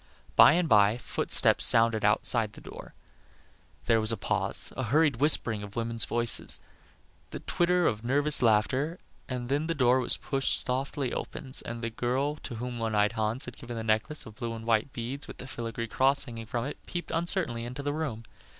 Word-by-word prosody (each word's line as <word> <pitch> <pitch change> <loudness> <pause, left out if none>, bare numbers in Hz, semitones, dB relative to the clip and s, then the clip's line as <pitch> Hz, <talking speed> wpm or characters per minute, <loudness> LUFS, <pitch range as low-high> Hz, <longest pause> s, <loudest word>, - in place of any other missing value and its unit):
By - - +8
and 175 0 +1
by 105 -2 +4
footsteps - - +1
sounded 115 -1 +4
outside 105 +1 +2
the - - -12
door. - - -11 0.9
There 115 -1 +3
was 110 +1 +4
a 115 - -1
pause; - - +1
a 130 - -3
hurried 145 +2 +2
whispering 120 -6 +3
of 105 0 -10
women's 115 -1 0
voices; 120 -1 +2 0.7
the - - -8
twitter 175 0 +1
of 110 0 0
a - - -6
nervous 145 +3 +2
laugh, 110 -2 +3
and 150 +7 -2 0.5
then 145 +4 -1
the 165 - -1
door 130 -2 +3
was 125 - +4
pushed 135 -2 -1
softly 130 +1 -2
opens 135 -1 -4
and 120 0 -7
the 115 - -3
girl 130 +6 -1
to 120 - -8
whom 120 +1 -5
the - - -6
one 110 -1 -1
eyed 105 0 +3
Hans 110 +2 -1
had 125 - -10
given 120 -1 -8
the 110 - -4
necklace 110 +8 0
of 110 - -11
blue 115 -1 -4
and 115 0 -9
white 115 +3 +1
beads 130 +4 -6
with - - -10
the - - -9
filigree 115 -3 -5
cross 135 +4 +3
hanging 115 -4 -8
from 120 +1 -3
it, 145 - -6
peeped 175 -1 -5
uncertainly 165 -8 -1
into 125 +4 -6
the 145 0 -2
room. 145 -8 -4
120 Hz, 200 wpm, -28 LUFS, 115-140 Hz, 0.9 s, By